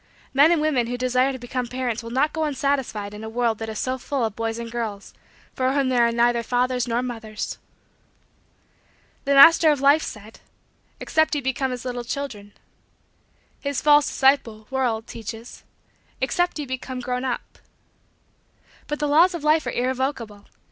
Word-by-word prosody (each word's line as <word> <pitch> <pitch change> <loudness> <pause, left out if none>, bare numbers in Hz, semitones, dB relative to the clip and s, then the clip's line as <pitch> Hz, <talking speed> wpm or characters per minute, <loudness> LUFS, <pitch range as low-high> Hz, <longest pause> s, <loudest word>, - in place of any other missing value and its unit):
Men 285 +4 +6
and 340 - +3
women 265 -7 +1
who 245 +1 -3
desire 255 +1 +1
to 260 - -6
become 245 0 -4
parents 245 -2 -3
will 230 - -8
not 270 +6 +1
go 320 - -1
unsatisfied 270 -7 -2
in 210 +1 -9
a 220 - -5
world 230 -1 0
that 225 0 -5
is 220 - -5
so 255 +3 -2
full 265 -1 -2
of 220 -2 -4
boys 225 0 -3
and 235 0 -6
girls 220 -4 -5 0.4
for 260 0 0
whom 275 -2 +1
there 240 -2 +3
are - - 0
neither 235 0 +2
fathers 250 +1 0
nor 240 +1 0
mothers. 225 -4 -5 1.7
The 280 0 +2
Master 325 +3 +8
of 295 -2 +2
Life 285 +3 +5
said: 215 -3 -9 0.6
"Except 315 0 +1
ye 290 - -1
become 265 0 -1
as 250 0 -6
little 245 -1 -4
children." 235 -6 -6 1.1
His 280 -2 -2
false 295 0 +5
disciple 245 -6 +1
world 240 -4 -1
teaches: 225 +1 -9 0.6
"Except 350 +7 0
ye 300 - -4
become 260 0 -5
grown 250 +1 -3
up." 255 -2 -4 1.3
But 295 - -3
the 295 - -1
laws 335 +5 +4
of 330 - -6
Life 305 -2 +3
are - - -1
irrevocable. 250 -5 -3
255 Hz, 170 wpm, -23 LUFS, 230-280 Hz, 1.7 s, Master